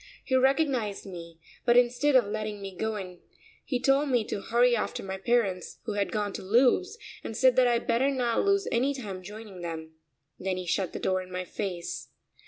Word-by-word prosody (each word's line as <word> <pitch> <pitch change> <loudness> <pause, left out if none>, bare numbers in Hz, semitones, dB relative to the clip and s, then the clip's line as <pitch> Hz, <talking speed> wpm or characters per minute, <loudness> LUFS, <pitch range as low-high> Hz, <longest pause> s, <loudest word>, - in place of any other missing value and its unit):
He 260 - 0
recognised 260 -6 +2
me, 170 -3 -9 0.3
but 240 -1 +4
instead 250 +4 +3
of 250 -4 +6
letting 215 0 -4
me 195 -1 -7
go 220 +3 -2
in 185 -3 -7 0.4
he 250 - -1
told 275 +3 +3
me 245 -4 +3
to 205 - -4
hurry 240 +2 +3
after 215 - -2
my 190 0 -5
parents, 195 -5 0
who 215 - -3
had 205 -1 -1
gone 205 -2 -1
to - - -5
Lewes, 260 - +3 0.3
and 220 - -5
said 260 -1 +5
that 255 -1 +5
I'd 235 -1 +1
better 245 +4 +2
not 245 -4 +1
lose 400 -1 +2
any 265 +4 +1
time 200 -8 -6
joining 205 -1 -9
them. 160 -2 -5 0.5
Then 185 0 -2
he 185 - -4
shut 180 +1 -1
the - - -3
door 185 0 0
in 185 0 -11
my 180 0 -3
face. 180 -2 -4
220 Hz, 200 wpm, -28 LUFS, 190-250 Hz, 0.5 s, of